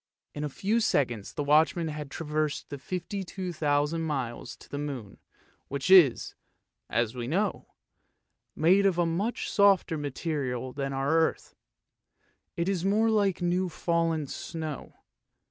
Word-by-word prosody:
In 150 - -5
a 150 - -2
few 205 +10 0
seconds 120 - 0
the 150 - -3
watchman 155 +3 +3
had 150 -2 -6
traversed 150 -1 -3
the 145 - -5
52,000 165 -4 -2
miles 135 -7 -3
to - - -17
the 145 - -5
moon, 135 -8 -6 0.5
which 140 +6 -2
is, 170 -10 +6 0.6
as 120 -1 0
we 120 -2 -5
know, 195 +8 -1 0.9
made 190 +5 +4
of 185 -3 +1
a 175 - +3
much 190 +8 -1
softer 195 -5 +4
material 135 -3 -3
than 135 -1 -3
our 135 +1 -1
earth; 165 -1 0 1.0
it 170 +1 0
is 190 -3 0
more 215 +3 +3
like 200 -4 +1
new 180 +1 +1
fallen 165 -2 0
snow. 155 +1 -6
160 Hz, 135 wpm, -28 LUFS, 140-180 Hz, 1.0 s, is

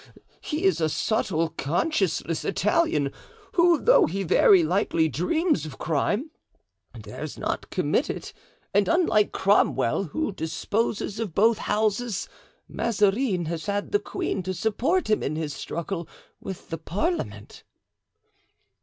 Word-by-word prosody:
He 305 0 -4
is 175 -4 +2
a 160 - +2
subtle, 165 -3 0
conscienceless 165 - -1
Italian, 190 - +1 0.4
who 345 -2 +4
though - - +5
he 195 +4 -2
very 180 +1 +5
likely 165 -1 +1
dreams 305 - 0
of 150 -4 -8
crime, 205 - -1 0.7
dares - - -7
not - - -3
commit - - 0
it; - - -5 0.4
and 205 +1 +3
unlike 330 - +3
Cromwell, 195 - +2
who 215 - -2
disposes 200 +5 -2
of 210 -8 -4
both 220 +2 +4
Houses, 215 0 -1 0.4
Mazarin 205 -3 +1
has 160 -1 -4
had 205 0 -2
the 205 - +3
queen 200 - -3
to 185 +1 -4
support 240 - 0
him 215 -1 +2
in 150 - -2
his 155 -2 -3
struggle 170 +4 -5 0.3
with 190 - -8
the 165 - -3
parliament." 310 - -3
195 Hz, 130 wpm, -25 LUFS, 165-225 Hz, 0.7 s, though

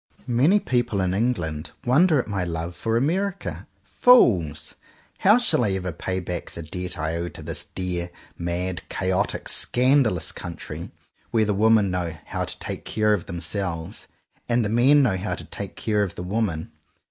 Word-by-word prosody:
Many 130 - +4
people 120 - 0
in 95 -1 +1
England 90 -9 -1
wonder 155 +6 +5
at - - -2
my 100 -3 -1
love 85 0 -4
for 115 0 0
America. 185 +9 -1 0.2
Fools! 85 - +4 0.5
How 210 +4 +6
shall 240 - +2
I 100 -4 +1
ever 90 -1 -2
pay 95 +3 -3
back 90 -1 -5
the 85 - -8
debt 90 +3 -5
I 80 +1 -2
owe 85 +1 -3
to - - -10
this - - -5
dear, 90 -1 -3 0.3
mad, 85 +1 -3
chaotic, 95 +2 -1
scandalous 125 - +2
country, 85 -2 -7 0.4
where 110 -2 +2
the 105 - +1
women 105 -1 +4
know 85 -3 -2
"how - - -3
to - - -3
take - - -5
care 105 -1 +1
of 95 -5 -2
them 85 0 -5
selves" 90 +1 -3 0.4
and 120 -1 +2
the - - -1
men 130 +6 +5
know 100 -7 +2
how 95 +3 -2
to - - -9
take - - -7
care 105 -1 0
of 100 -3 -2
the - - -5
women! 90 -5 -2
100 Hz, 175 wpm, -24 LUFS, 85-120 Hz, 0.5 s, How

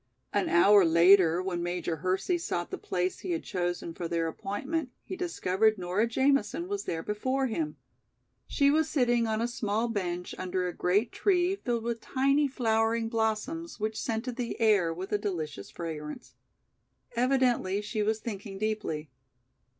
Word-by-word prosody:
An 205 -1 +1
hour 195 +4 +6
later, 170 +1 +5
when 180 -2 -2
Major 175 -1 -2
Hersey 190 - 0
sought 175 - -3
the - - -3
place 180 0 -2
he 360 - -3
had 330 - -3
chosen 175 -3 -3
for 170 0 -4
their 165 0 0
appointment, 260 - -3
he - - -6
discovered 220 - +1
Nora 185 +5 0
Jamison 275 +7 +1
was 405 0 -3
there 165 -1 -3
before 260 +6 -1
him. 300 +6 -2 0.7
She 280 -1 +3
was 315 +1 +2
sitting 240 -4 +2
on 220 0 0
a 235 - +1
small 225 -1 -1
bench 180 -5 -3
under 185 0 -1
a 175 - -4
great 205 +6 +1
tree 365 -1 +2
filled 240 - -2
with 235 -1 -3
tiny 275 +2 +2
flowering 225 -3 +1
blossoms 230 +9 -2
which 215 0 -2
scented 235 +2 -3
the 245 -1 -3
air 205 -7 +4
with 180 +4 -6
a 210 - +1
delicious 155 - -4
fragrance. 150 -6 -7 0.8
Evidently 245 -6 +2
she 210 +1 -3
was 215 +1 +1
thinking 200 -3 -6
deeply. 205 -8 -3
215 Hz, 160 wpm, -29 LUFS, 180-250 Hz, 0.8 s, hour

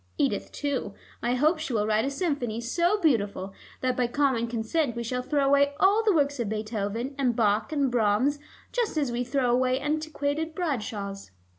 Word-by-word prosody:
Edith 275 - 0
too: 265 -8 -3 0.3
I 245 +1 +1
hope 310 +5 +3
she 310 -5 -4
will 210 -2 +1
write 215 +2 +2
a - - 0
symphony 280 - -2
so 345 - +1
beautiful 205 - 0 0.3
that 255 -1 +1
by 245 -1 +1
common 260 -3 +1
consent 235 +4 -1
we 235 - -3
shall 250 +2 -2
throw 285 +2 +1
away 280 +1 +3
all 400 +3 +5
the 435 - +4
works 285 -5 +1
of 230 -4 -1
Beethoven 215 +3 -3
and 250 -4 +2
Bach 215 0 +1
and 280 -4 +1
Brahms 240 +5 +2 0.3
just 470 -9 -1
as 280 -5 +1
we 240 +1 -1
throw 250 -1 +1
away 255 +1 +2
antiquated 310 +1 -2
Bradshaws." 210 - -3
255 Hz, 180 wpm, -27 LUFS, 230-290 Hz, 0.3 s, all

